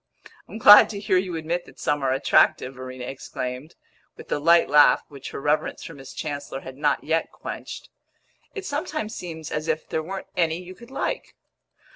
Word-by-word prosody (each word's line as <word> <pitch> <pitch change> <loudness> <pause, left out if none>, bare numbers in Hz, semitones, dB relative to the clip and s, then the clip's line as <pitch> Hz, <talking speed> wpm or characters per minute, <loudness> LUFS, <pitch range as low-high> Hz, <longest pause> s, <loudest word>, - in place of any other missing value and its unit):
"I'm - - -8
glad 210 -2 +9
to 205 - -5
hear 195 -2 +2
you 180 -2 -4
admit 165 +2 -2
that - - -17
some 145 -1 0
are 130 - +2
attractive!" 130 0 +3
Verena 130 -1 -8
exclaimed, 130 +2 -6 0.4
with - - -12
the - - 0
light 170 +3 +5
laugh 145 +1 +6
which 140 -2 -9
her - - -6
reverence 150 +2 0
for 165 - -8
Miss 135 -3 -11
Chancellor 145 -2 -5
had 130 - -9
not 145 +1 0
yet 165 +1 0
quenched. - - -8 0.7
"It 400 -2 -5
sometimes 290 - -3
seems 160 -3 -7
as 155 +1 -3
if 160 -1 -1
there 160 - -2
weren't 190 +4 -6
any 165 -2 +1
you 180 +1 -9
could 235 +5 -15
like!" 270 - -4
160 Hz, 185 wpm, -24 LUFS, 140-180 Hz, 0.7 s, glad